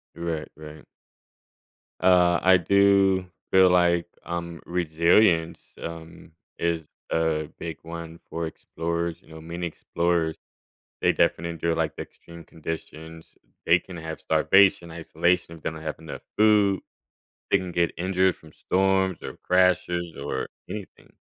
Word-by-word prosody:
Right, 85 Hz, -2 st, -3 dB
right. 75 Hz, 0 st, -11 dB, 1.2 s
Uh, 90 Hz, -1 st, +5 dB
I 95 Hz, 0 st, +6 dB
do 95 Hz, 0 st, +3 dB, 0.2 s
feel 95 Hz, -1 st, +6 dB
like, 85 Hz, -1 st, +3 dB, 0.2 s
um, 85 Hz, -1 st, -5 dB
resilience, 85 Hz, +1 st, +2 dB
um, 85 Hz, 0 st, -9 dB, 0.3 s
is 85 Hz, -2 st, -1 dB, 0.2 s
a 80 Hz, -2 st, 0 dB
big 80 Hz, -1 st, -5 dB
one 85 Hz, 0 st, -8 dB
for 85 Hz, 0 st, -3 dB
explorers. 85 Hz, +2 st, -4 dB
You -, -, -23 dB
know, 80 Hz, 0 st, -11 dB
many 85 Hz, +2 st, -4 dB
explorers, 85 Hz, 0 st, -1 dB, 0.6 s
they -, -, +3 dB
defin 85 Hz, -, +1 dB
endure, 85 Hz, 0 st, -1 dB
like, 80 Hz, -2 st, -1 dB
the -, -, -4 dB
extreme 85 Hz, 0 st, -14 dB
conditions. 80 Hz, 0 st, -8 dB, 0.3 s
They 85 Hz, -, +6 dB
can 90 Hz, -2 st, -11 dB
have 80 Hz, 0 st, -6 dB
starvation, 95 Hz, -3 st, +3 dB
isolation, 85 Hz, +1 st, 0 dB
if 80 Hz, -, -17 dB
they -, -, -1 dB
don't 80 Hz, 0 st, -9 dB
have 80 Hz, -, -4 dB
enough 80 Hz, -2 st, -9 dB, 0.2 s
food. 105 Hz, -3 st, +4 dB, 0.7 s
They -, -, +6 dB
can 90 Hz, -1 st, -5 dB
get 85 Hz, -1 st, +2 dB
injured 95 Hz, +1 st, +2 dB
from 80 Hz, -1 st, -17 dB
storms 95 Hz, -1 st, +1 dB
or -, -, -7 dB
crashes 90 Hz, -2 st, +1 dB
or 70 Hz, -2 st, -3 dB, 0.2 s
anything. 105 Hz, -3 st, -9 dB
85 Hz, 135 wpm, -25 LUFS, 80-90 Hz, 1.2 s, I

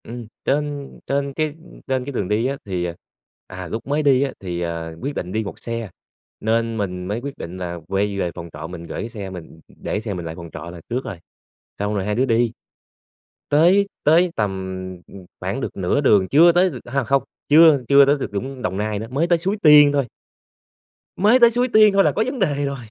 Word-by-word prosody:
Ừm, 120 Hz, -1 st, -8 dB, 0.2 s
trên 145 Hz, -1 st, -1 dB, 0.2 s
trên 140 Hz, 0 st, -1 dB
cái 155 Hz, 0 st, -2 dB, 0.3 s
trên 130 Hz, -2 st, -1 dB
cái 140 Hz, -, -5 dB
đường 105 Hz, -8 st, -2 dB
đi 105 Hz, +4 st, 0 dB
á, 135 Hz, +1 st, -1 dB
thì, 90 Hz, -3 st, -2 dB
ờ 85 Hz, -1 st, -4 dB, 0.5 s
à, 95 Hz, -1 st, -7 dB
lúc 115 Hz, +3 st, -5 dB
mới 145 Hz, +2 st, 0 dB
đi 135 Hz, -3 st, +4 dB
á, 140 Hz, -, -2 dB
thì, 90 Hz, -2 st, -4 dB
à, 85 Hz, -1 st, -4 dB
quyết 140 Hz, +1 st, -4 dB
định 90 Hz, -, -4 dB
đi 110 Hz, +2 st, -1 dB
1 100 Hz, -, -8 dB
xe, 115 Hz, -2 st, -5 dB, 0.5 s
nên 115 Hz, +1 st, 0 dB
mình 90 Hz, -3 st, -3 dB
mới 105 Hz, +4 st, -2 dB
quyết 140 Hz, +1 st, -7 dB
định 85 Hz, +2 st, -7 dB
là 85 Hz, -1 st, -5 dB
quay 100 Hz, +1 st, -1 dB
về 90 Hz, -2 st, -1 dB
phòng 85 Hz, -1 st, -8 dB
trọ 75 Hz, +2 st, -7 dB
mình 85 Hz, -1 st, -8 dB
gởi 85 Hz, -, -6 dB
cái 115 Hz, -, -5 dB
xe 100 Hz, -4 st, -7 dB
mình, 90 Hz, -3 st, -7 dB
ừm, 80 Hz, -, -17 dB
ừm, -, -, -22 dB
để -, -, -1 dB
xe 110 Hz, -2 st, -4 dB
mình 90 Hz, -2 st, -5 dB
lại 80 Hz, 0 st, -6 dB
phòng 85 Hz, -1 st, -9 dB
trọ 85 Hz, -, -7 dB
là 85 Hz, -1 st, -10 dB
trước 125 Hz, +3 st, -2 dB
rồi, 95 Hz, -, -6 dB, 0.6 s
xong 105 Hz, +1 st, -1 dB
rồi 100 Hz, -2 st, -1 dB
hai 105 Hz, +1 st, -1 dB
đứa 125 Hz, +4 st, +2 dB
đi. 115 Hz, -2 st, +2 dB, 1.0 s
Tới 180 Hz, +7 st, +4 dB, 0.2 s
tới 170 Hz, +4 st, +4 dB
tầm, 105 Hz, -2 st, +1 dB, 0.6 s
ừm, 95 Hz, -2 st, -12 dB, 0.2 s
khoảng -, -, -3 dB
được -, -, -5 dB
nửa 95 Hz, +9 st, +1 dB
đường 100 Hz, -9 st, +4 dB
chưa 170 Hz, +4 st, +6 dB
tới 180 Hz, +2 st, +3 dB
a, 135 Hz, +2 st, -1 dB
không, 135 Hz, +2 st, +2 dB, 0.3 s
chưa 155 Hz, -2 st, +7 dB
chưa 140 Hz, 0 st, +7 dB
tới 145 Hz, +1 st, +4 dB
được 135 Hz, -, -5 dB
Vũng 130 Hz, +5 st, -5 dB
Đồng 95 Hz, -, -2 dB
Nai 105 Hz, 0 st, -2 dB
nữa, 110 Hz, -, -5 dB
mới 145 Hz, +6 st, +1 dB
tới 175 Hz, -1 st, +3 dB
Suối 195 Hz, +5 st, -1 dB
Tiên 150 Hz, -2 st, +8 dB
thôi. 140 Hz, -3 st, +1 dB, 1.1 s
Mới 215 Hz, +7 st, +5 dB
tới 235 Hz, -1 st, +7 dB
Suối 245 Hz, +2 st, +1 dB
Tiên 215 Hz, -3 st, +5 dB
thôi 195 Hz, 0 st, +5 dB
là -, -, +3 dB
có 220 Hz, -, 0 dB
vấn 255 Hz, +1 st, -4 dB
đề 145 Hz, -1 st, 0 dB
rồi. 140 Hz, 0 st, -3 dB
120 Hz, 235 wpm, -21 LUFS, 95-145 Hz, 1.1 s, Tiên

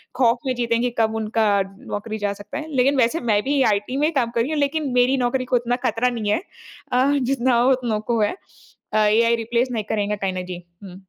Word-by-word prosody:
खौफ 240 Hz, -2 st, +3 dB
में 255 Hz, -, +1 dB
जीते 235 Hz, -1 st, 0 dB
हैं 230 Hz, -, 0 dB
कि 245 Hz, -, +1 dB
कब 220 Hz, 0 st, +2 dB
उनका 215 Hz, -2 st, +1 dB, 0.3 s
नौकरी 215 Hz, +1 st, -4 dB
जा 205 Hz, -1 st, -1 dB
सकता 205 Hz, +7 st, -8 dB
है। 310 Hz, 0 st, -6 dB
लेकिन 270 Hz, +2 st, +3 dB
वैसे 250 Hz, +7 st, +2 dB
मैं 205 Hz, 0 st, +3 dB
भी 280 Hz, 0 st, +1 dB
आईटी 210 Hz, +7 st, -3 dB
में 300 Hz, +2 st, +2 dB
ही -, -, -1 dB
काम 245 Hz, -4 st, +1 dB
कर 230 Hz, -, +3 dB
रही 275 Hz, +7 st, -2 dB
हूँ, 305 Hz, -, -1 dB
लेकिन 285 Hz, 0 st, 0 dB
मेरी 250 Hz, +2 st, +3 dB
नौकरी 255 Hz, +1 st, -1 dB
को -, -, +6 dB
इतना 240 Hz, +1 st, -1 dB
खतरा 230 Hz, +3 st, +1 dB
नहीं 220 Hz, -4 st, -2 dB
है। 270 Hz, -, +1 dB, 0.5 s
अ, 260 Hz, +3 st, +3 dB
जितना 255 Hz, -1 st, +1 dB
हो 255 Hz, +2 st, +4 dB
उतनों 240 Hz, -4 st, 0 dB
को 230 Hz, -2 st, +1 dB
है 210 Hz, -, +1 dB, 0.6 s
अ, -, -, +2 dB
एआई 225 Hz, +2 st, +4 dB
रिप्लेस 235 Hz, +2 st, 0 dB
नहीं 220 Hz, -3 st, -2 dB
करेंगे 210 Hz, -1 st, 0 dB
कहीं 195 Hz, -1 st, -2 dB
ना 185 Hz, -, -3 dB
जी। 180 Hz, 0 st, -6 dB, 0.3 s
हुँ। 185 Hz, -2 st, -10 dB
235 Hz, 245 wpm, -22 LUFS, 215-260 Hz, 0.6 s, को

